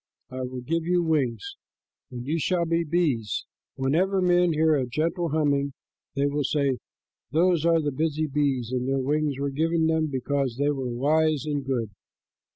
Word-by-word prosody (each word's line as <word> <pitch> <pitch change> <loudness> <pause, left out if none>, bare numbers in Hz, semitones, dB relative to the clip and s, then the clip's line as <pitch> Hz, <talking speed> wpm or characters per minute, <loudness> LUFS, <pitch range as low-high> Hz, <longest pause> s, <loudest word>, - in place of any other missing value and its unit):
I 130 0 -5
will 125 0 -5
give 165 +6 -1
you 175 +1 +1
wings, 160 - -1 0.5
and 125 -2 -7
you 160 +4 -1
shall 175 +2 +1
be 165 +1 +1
bees. 150 -10 0 0.3
Whenever 170 +9 +1
men 180 -1 +3
hear 160 0 +3
a 135 -4 +1
gentle 165 +6 -1
humming, 140 -2 +1 0.4
they 140 0 +1
will 145 +1 0
say, 140 -2 0 0.5
'Those 170 +1 +2
are 165 -1 +4
the 145 - 0
busy 155 +2 -1
bees, 135 -5 0
and 125 0 -1
their 135 - +1
wings 145 +1 0
were 140 0 -2
given 160 +3 +1
them 160 0 +2
because 135 -2 -1
they 145 +1 +2
were 135 -3 -3
wise 150 +4 +1
and 145 -2 -2
good.'" 120 -5 -2
150 Hz, 170 wpm, -26 LUFS, 135-165 Hz, 0.5 s, are